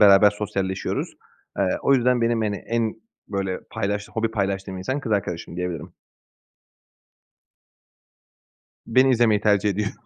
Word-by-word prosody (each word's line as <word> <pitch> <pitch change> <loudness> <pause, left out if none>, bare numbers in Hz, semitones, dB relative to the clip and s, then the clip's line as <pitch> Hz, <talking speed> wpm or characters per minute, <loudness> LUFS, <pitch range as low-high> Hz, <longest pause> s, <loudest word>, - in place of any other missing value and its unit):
beraber 100 0 +8
sosyalleşiyoruz. 95 -2 -2 0.5
Eee, 100 - +3 0.2
o 140 - +4
yüzden 125 -1 +3
benim, 115 0 +2
hani, 105 -2 -1
en 115 -1 0 0.3
böyle 95 -2 -2
paylaştı 105 +1 -3
hobi 115 0 0
paylaştığım 95 -3 -2
insan 130 +10 -2
kız 115 -5 -3
arkadaşım 90 -4 -2
diyebilirim. 90 -3 -4 3.0
Beni 130 +3 +4
izlemeyi 110 -4 +3
tercih 105 -1 +3
ediyor. 105 +1 -1
105 Hz, 120 wpm, -24 LUFS, 95-115 Hz, 3.0 s, beraber